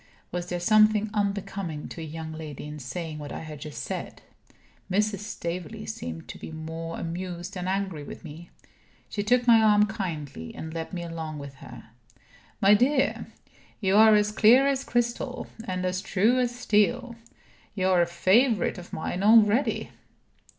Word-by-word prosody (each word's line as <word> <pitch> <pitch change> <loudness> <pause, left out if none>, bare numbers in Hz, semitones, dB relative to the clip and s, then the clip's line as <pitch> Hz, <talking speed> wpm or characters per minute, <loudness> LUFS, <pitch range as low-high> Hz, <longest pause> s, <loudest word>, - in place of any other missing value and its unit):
Was 175 0 -4
there 175 - -2
something 215 +2 +4
unbecoming 200 -6 -2
to 165 - -8
a - - -4
young 160 0 -6
lady 155 -3 -7
in 150 0 -7
saying 150 +4 -5
what 145 -1 -7
I - - -5
had 155 -2 -8
just 150 -1 -6
said? - - -6 0.7
Mrs. 205 +1 +1
Staveley 175 -5 -5
seemed 80 -6 -6
to - - -8
be - - -8
more 160 +1 -6
amused 175 +2 -5
than 180 -1 -4
angry 190 -4 -2
with - - -9
me. 165 +1 -10 0.6
She 205 - -2
took 245 +4 +2
my 230 -2 +7
arm 210 -1 +5
kindly, 160 - -5
and 160 0 -7
led 165 -1 -5
me 175 -2 -4
along 160 -2 -5
with 140 -1 -8
her. 110 - -12 0.7
"My 200 -1 +6
dear, 265 +6 +2 0.5
you 195 -2 +2
are 220 0 +8
as 210 0 +2
clear 235 +5 +6
as 275 -1 +1
crystal, 240 +1 -1 0.2
and 185 -1 -2
as 185 0 -1
true 220 +8 +2
as 250 -1 +2
steel. 245 +1 +1 0.6
You 185 -2 +1
are 180 -2 +4
a 170 - +2
favorite 205 +4 +2
of 175 - -12
mine 175 +3 -3
already." 220 +4 +4
185 Hz, 165 wpm, -27 LUFS, 160-215 Hz, 0.7 s, are